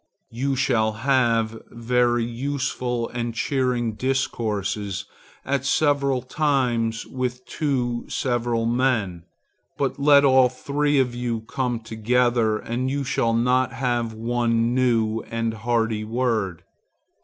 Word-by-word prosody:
You 135 +4 -1
shall 110 -4 +1
have 115 -2 +1
very 120 0 +1
useful 125 -1 -2
and 120 -1 -4
cheering 125 -3 0
discourse 105 -6 -2 0.4
at 135 -1 0
several 140 -3 +1
times 125 -6 0
with 125 -1 -4
two 120 -3 -1
several 120 -2 -1
men, 115 -8 0 0.5
but 140 0 -1
let 140 0 +6
all 130 -2 +5
three 145 +3 0
of 130 -2 +2
you 120 -2 -2
come 120 +1 -2
together 115 0 +1
and 120 +4 -3
you 140 +1 -1
shall 115 -3 0
not 125 +2 +2
have 120 -3 -1
one 115 +1 0
new 115 -3 +1
and 115 0 -1
hearty 115 -1 0
word. 110 -6 -1
120 Hz, 115 wpm, -23 LUFS, 115-130 Hz, 0.5 s, let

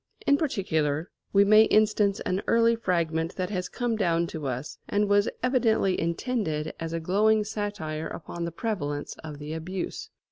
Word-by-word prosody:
In 280 - +5
particular, 160 - -1 0.2
we 200 0 +5
may 215 +2 +7
instance 210 -2 +3
an 185 +2 -1
early 230 0 +4
fragment 170 -5 -1
that 185 +1 -3
has 180 -2 -2
come 240 -2 -1
down 170 -5 +1
to 155 -3 -4
us, 130 +3 -5
and 205 0 +2
was 205 0 +3
evidently 230 -7 +2
intended 170 -4 -1
as 165 0 -4
a 165 - -2
glowing 210 +6 +3
satire 205 -7 -4
upon 170 +1 -6
the 170 - -4
prevalence 160 -7 -3
of 150 -2 -7
the 150 +2 -6
abuse. 175 +3 -5
185 Hz, 165 wpm, -27 LUFS, 160-215 Hz, 0.2 s, may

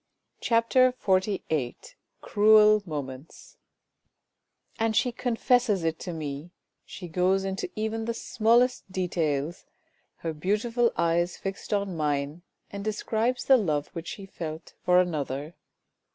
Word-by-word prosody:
" - - -46
CHAPTER 250 +2 +4
XLVIII 185 - 0 0.5
CRUEL 215 0 +5
MOMENTS 140 -2 -7 1.2
And 225 -1 +1
she 245 +3 +2
confesses 240 -4 +1
it 165 0 -1
to 180 - -5
me! 150 0 -5 0.4
She 180 - -8
goes 185 +3 +1
into 195 0 -3
even 220 +1 -2
the 230 0 -2
smallest 235 -1 +2
details! 170 -4 -2 0.5
Her 165 -1 -4
beautiful 225 +8 +1
eyes 170 +1 +1
fixed 195 0 -6
on 200 -3 0
mine, 145 +1 -1 0.3
and 200 0 -6
describes 220 +3 -1
the 265 - +7
love 150 - -1
which 165 0 -7
she 200 - -7
felt 160 -4 -7
for 180 0 +5
another. 150 -3 -2
190 Hz, 125 wpm, -27 LUFS, 160-220 Hz, 1.2 s, the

